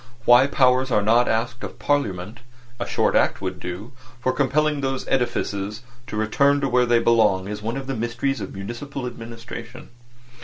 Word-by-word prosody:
Why 120 +3 +7
powers 130 -1 +3
are 105 - +2
not 115 +3 +4
asked 120 +2 -1
of - - -7
Parliament 105 -7 -1 0.4
(a - - -3
short - - +1
act - - +3
would 95 -1 -4
do) 90 +7 -6 0.3
for 130 +1 +1
compelling 145 +2 +1
those 135 -1 -2
edifices 105 -4 -1 0.2
to 105 - -5
return 140 +7 +3
where 125 0 +3
they 120 0 +4
belong 110 -5 +3
is 105 0 -5
one 115 +4 -3
of 135 - -5
the 135 - -3
mysteries 120 +2 -2
of 95 - -6
municipal 120 +7 -6
administration. 120 +1 -8
120 Hz, 165 wpm, -23 LUFS, 105-130 Hz, 0.4 s, Why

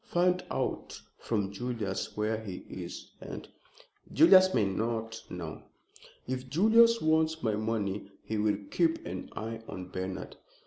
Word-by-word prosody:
Find 180 +1 +2
out - - -2 0.2
from 100 -4 -1
Julius 110 -4 -3
where 110 +1 0
he 95 -4 -7
is, - - -7
and - - -7 0.3
" - - -25
"Julius 185 -1 +7
may 110 - +3
not 115 +3 -2
know!" 85 -3 -6 0.7
"If 130 0 -3
Julius 225 - +6
wants 160 0 +2
my 110 -2 +2
money 105 -2 -2
he 110 -1 -2
will 105 -1 +2
keep 165 -2 +2
an 90 +1 -5
eye 115 +1 -4
on 90 -1 -7
Bernard." 95 0 -5
110 Hz, 140 wpm, -30 LUFS, 100-160 Hz, 0.7 s, Julius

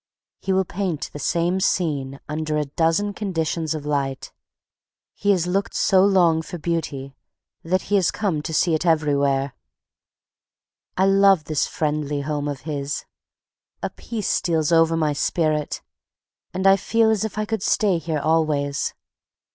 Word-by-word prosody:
He 195 - -2
will 190 0 +2
paint 180 -4 -3
the 145 - -7
same 175 +4 0
scene 145 -8 -1
under 155 0 -2
a 150 - 0
dozen 165 +8 0
conditions 165 -5 -2
of 150 -2 -6
light. 140 -3 -2 0.8
He 205 - -2
has 185 -4 +3
looked 195 +3 -1
so 190 -1 +4
long 175 -5 +4
for 175 - -7
Beauty 150 -5 -3 0.5
that 185 +3 0
he 205 - +1
has 185 - +2
come 185 -8 -1
to 160 - -5
see 165 +1 +2
it 155 - 0
everywhere. 140 -4 +1 1.4
I 190 - +4
love 195 -3 +5
this 155 -1 0
friendly 150 -2 -2
home 145 0 -2
of 145 -2 -4
his. 145 -1 -4 0.8
A - - -2
peace 220 -4 -5
steals 160 -2 +1
over 165 0 +4
my 155 -2 +1
spirit, 155 0 -1 0.7
and 190 +1 -3
I 195 0 +7
feel 225 +2 +2
as 220 -1 +1
if 220 -1 -4
I 215 - 0
could 220 -1 -2
stay 195 -4 +2
here 160 -2 -2
always. 150 -3 0
165 Hz, 155 wpm, -23 LUFS, 150-190 Hz, 1.4 s, I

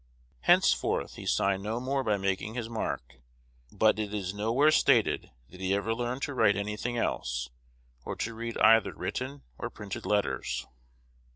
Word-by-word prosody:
Henceforth - - +3
he - - -8
signed 95 0 +2
no 110 +4 -2
more 135 +2 -1
by 105 -4 +1
making 95 +3 -2
his 120 -3 -3
mark; 110 - -4 0.5
but 110 0 +3
it 105 -1 -2
is 95 -2 -3
nowhere 115 +9 +3
stated - - +3 0.2
that 90 - -12
he 95 +1 +1
ever 100 +3 0
learned 120 +3 -3
to 145 - -2
write 105 -6 +4
any 105 +1 -2
thing 120 +2 -3
else, - - -2 0.5
or - - -4
to 115 - -3
read 115 +1 -5
either 115 0 +5
written 135 +2 -4 0.2
or 120 - -3
printed 105 -4 -7
letters. 100 -12 0
110 Hz, 165 wpm, -29 LUFS, 100-120 Hz, 0.5 s, either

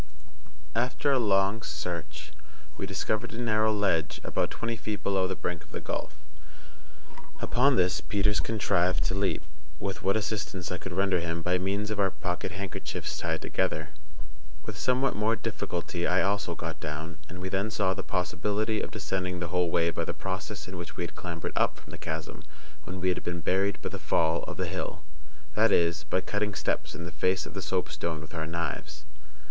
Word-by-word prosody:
After 125 +4 +2
a 135 - +5
long 100 -1 +3
search 75 -2 -4 0.4
we 95 - -3
discovered 105 +3 -1
a - - -4
narrow 110 -2 +3
ledge 95 -8 +2
about - - +1
twenty 115 0 -2
feet 105 -2 -4
below 95 -2 +3
the 95 - -1
brink 90 -2 -3
of - - -21
the - - -4
gulf; 75 - -3 1.2
upon 135 +2 +4
this 90 -1 +3
Peters 105 0 +2
contrived 95 -5 +2
to - - 0
leap, 95 0 +1 0.4
with 100 -1 -2
what 100 +2 +3
assistance 100 -4 -2
I 90 - -1
could 95 - -5
render 95 0 +3
him 85 0 -2
by 90 +1 +3
means 100 +3 0
of 105 - -1
our 95 -1 +5
pocket 90 -1 -2
handkerchiefs 100 +1 -3
tied - - -1
together. - - 0 0.8
With 110 - -4
somewhat 130 +6 +2
more 110 +2 +3
difficulty 90 -5 -2
I 90 +1 +4
also 100 -3 +1
got 80 0 -4
down; 75 +1 -4
and 90 - -7
we 95 +1 -2
then 95 +3 +1
saw 100 -3 +2
the 95 - -3
possibility 100 +5 0
of - - -2
descending 95 -4 -2
the 85 -1 -2
whole 90 0 +3
way 85 0 +3
by - - -1
the - - -2
process 95 +2 -3
in 95 0 -6
which 85 - -6
we - - 0
had 85 - -4
clambered 85 -2 -4
up - - +3
from - - -13
the - - -8
chasm - - -4 0.4
when 95 +1 -5
we 95 - +3
had 90 - 0
been 85 0 -2
buried 95 +3 +2
by - - -1
the - - -5
fall 80 +1 +3
of - - -6
the - - 0
hill—that 75 +7 -2
is, 85 -2 +3
by 95 - +1
cutting 105 +1 -1
steps - - -1
in 85 - -5
the 85 - -5
face 90 +1 +2
of - - -8
the - - -3
soapstone 80 -2 -1
with 80 +2 -10
our 80 -2 -2
knives. 75 -2 -3
95 Hz, 190 wpm, -29 LUFS, 85-105 Hz, 1.2 s, a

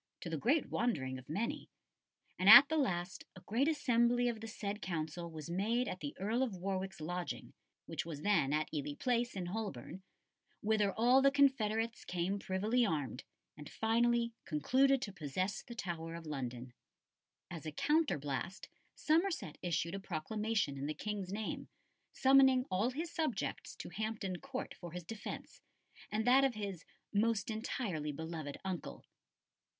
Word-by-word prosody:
to 170 - -6
the - - 0
great 255 - +1
wondering 135 - 0
of 130 - -16
many; 210 +10 -2 0.7
and 185 +2 +5
at 280 +5 +12
the 320 - +1
last 185 - -1
a 185 - -11
great 240 +10 +1
assembly 245 -5 +3
of 230 -2 -2
the 225 - -6
said 210 -1 -4
Council 170 -1 -3
was 155 -2 -8
made 220 +8 0
at 185 - -4
the 145 -4 -5
Earl 220 +6 0
of 245 -7 0
Warwick's 190 0 -3
lodging, 175 +3 -4 0.3
which - - -3
was 160 -3 -6
then 175 -10 +3
at 155 +1 +1
Ely 145 -1 -3
Place, 240 -2 +1
in 185 -2 -3
Holborn, 190 - -5 0.6
whither 210 -2 +2
all 245 +6 +5
the 275 - +6
confederates 230 -5 +2
came 180 +3 -1
privily 210 +7 +1
armed, 145 - -1 0.3
and 150 - -10
finally 235 +1 +2
concluded 260 - +3
to 200 - -5
possess 185 +4 -2
the 235 - -10
Tower 165 -6 -4
of 170 -1 -8
London." 125 -4 -5 0.8
As 165 -2 -6
a - - -3
counterblast, 185 - 0 0.3
Somerset 320 - +1
issued 170 0 -1
a 195 - -3
proclamation 195 -2 -1
in 140 - -2
the 155 - -3
King's 205 -3 -4
name, 210 +1 -4 0.4
summoning 265 -1 +5
all 200 +6 +2
his 315 +6 -4
subjects 310 -10 -2
to - - -7
Hampton 210 -1 -3
Court 275 -1 -5
for 175 -2 -9
his 180 0 -5
defence 210 +5 -7 0.5
and 220 +1 0
that 260 +2 +6
of 265 -4 +2
his 200 -5 -5 0.3
"most 220 0 +1
entirely 210 - -2
beloved 160 -1 -5
uncle." 170 - -5
200 Hz, 155 wpm, -35 LUFS, 165-235 Hz, 0.8 s, at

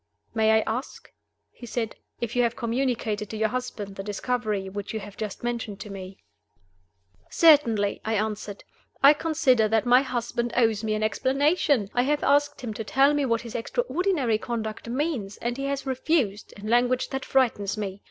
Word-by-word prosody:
"May 220 -1 +2
I 220 0 +5
ask," 245 +6 -5 0.4
he 240 - -11
said, 225 -1 -3 0.3
"if 235 0 -3
you 245 - +3
have 235 -1 +1
communicated 235 -4 -1
to 220 - -5
your 220 0 +1
husband 210 -5 -5
the - - -3
discovery 210 -1 -2
which 205 +3 -6
you - - -1
have 205 -1 -10
just 215 -1 -6
mentioned 230 -4 -3
to 205 - -8
me?" 190 -1 -8 1.1
"Certainly!" 235 -11 +4
I 220 0 -1
answered. 210 -1 -3 0.4
"I 280 +2 +9
consider 295 -8 +2
that 220 +1 +1
my 245 +1 +6
husband 240 -2 -2
owes 225 -3 +2
me 215 -1 0
an 215 - -2
explanation. 270 - +1
I 245 - +3
have 290 +3 0
asked 290 +1 +2
him 235 -4 -4
to 220 - -5
tell 270 +6 +3
me 290 -1 +1
what 230 -1 +1
his 235 -2 -9
extraordinary 335 - 0
conduct 225 -1 -4
means 250 -7 -2
and 240 +1 -3
he 275 +1 -4
has 275 0 -2
refused, 260 -5 0
in 205 - -9
language 245 +2 +2
that 270 -1 -3
frightens 225 -6 +1
me. 200 -2 -4
235 Hz, 180 wpm, -26 LUFS, 215-265 Hz, 1.1 s, I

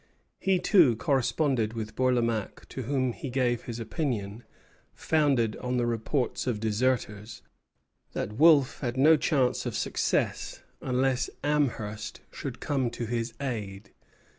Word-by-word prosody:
He 190 -1 +2
too 170 - +5
corresponded 125 -2 +1
with 110 -1 -5
Bourlamaque, 120 -4 0
to 130 - -5
whom 130 0 0
he 135 - -6
gave 125 -2 0
his 120 -1 -5
opinion, 115 -3 -3 0.5
founded 140 -9 +2
on 125 0 -2
the 120 - +1
reports 120 +4 -1
of 115 -4 0
deserters, 110 -1 -1 0.7
that 105 - -3
Wolfe 145 +1 +5
had 125 -2 -3
no 155 +4 +7
chance 135 -4 +1
of - - -4
success - - -1 0.2
unless 130 0 0
Amherst 120 -8 -1
should - - -6
come 135 -4 0
to 120 0 -5
his 115 0 -3
aid. 105 -7 -5
125 Hz, 130 wpm, -28 LUFS, 110-135 Hz, 0.7 s, no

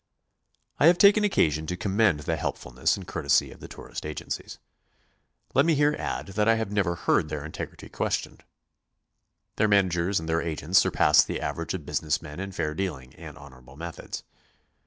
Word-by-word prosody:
I 145 - +6
have 175 +1 +6
taken 205 +2 +6
occasion 80 - +1
to 90 - -3
commend 100 -5 +2
the - - -1
helpfulness 65 0 -1
and - - -8
courtesy - - +1
of - - -14
the - - -9
tourist - - -9
agencies. 75 0 -6 1.0
Let 140 - +5
me 165 0 +3
here 145 +1 +3
add - - -4
that 105 +2 0
I 115 - +5
have 110 -3 -3
never 95 -4 +1
heard 75 - +1
their 75 -1 -4
integrity 75 - -7
questioned. - - -3 1.1
Their 110 - +3
man 100 -2 +5
agers 90 +2 0
and 80 - -7
their 80 0 +1
agents 85 +2 +2
surpass 75 0 +4
the - - -4
average - - -3
of - - -7
business 75 -1 -1
men 75 +2 -9
in 95 0 -5
fair 80 -5 -2
dealing 75 -8 -4
and 75 -3 -11
honorable 65 -2 -15
methods. 85 +1 -7
85 Hz, 180 wpm, -26 LUFS, 75-105 Hz, 1.1 s, I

